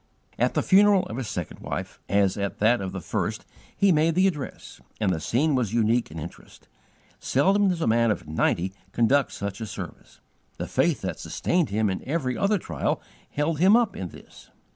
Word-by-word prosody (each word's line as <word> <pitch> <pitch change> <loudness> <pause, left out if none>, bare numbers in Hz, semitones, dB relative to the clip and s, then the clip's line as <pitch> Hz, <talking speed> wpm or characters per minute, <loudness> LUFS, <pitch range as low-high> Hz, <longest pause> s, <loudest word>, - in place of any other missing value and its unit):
At - - +1
the - - +2
funeral 200 -1 +5
of 110 - -6
his 130 -4 -3
second 90 -5 -5
wife, - - -5
as 100 -1 +3
at 100 -1 -3
that 115 +2 +3
of 95 -1 -4
the 95 - -5
first, - - -3 0.3
he 200 -1 +4
made 160 0 +3
the 185 +1 +4
address, 150 -8 -4 0.2
and 100 -4 +1
the 80 - -2
scene 130 - +1
was 120 -5 0
unique 115 +1 +2
in 80 - -9
interest. 80 +2 -10 0.5
Seldom 195 +8 +3
does 175 -2 -1
a - - +1
man 115 +1 +3
of 105 - -2
ninety 85 +4 0 0.2
conduct 130 +4 +3
such 100 +1 -5
a 110 - -4
service. - - -9 0.4
The - - -3
faith - - +1
that - - -4
sustained 175 -5 0
him 105 +2 +1
in 95 -2 -3
every 135 -4 -1
other 205 +1 +2
trial 85 - -2 0.3
held 150 +1 -1
him 190 +5 +6
up 235 -3 +2
in 90 - -5
this. - - -15
120 Hz, 195 wpm, -25 LUFS, 100-165 Hz, 0.5 s, him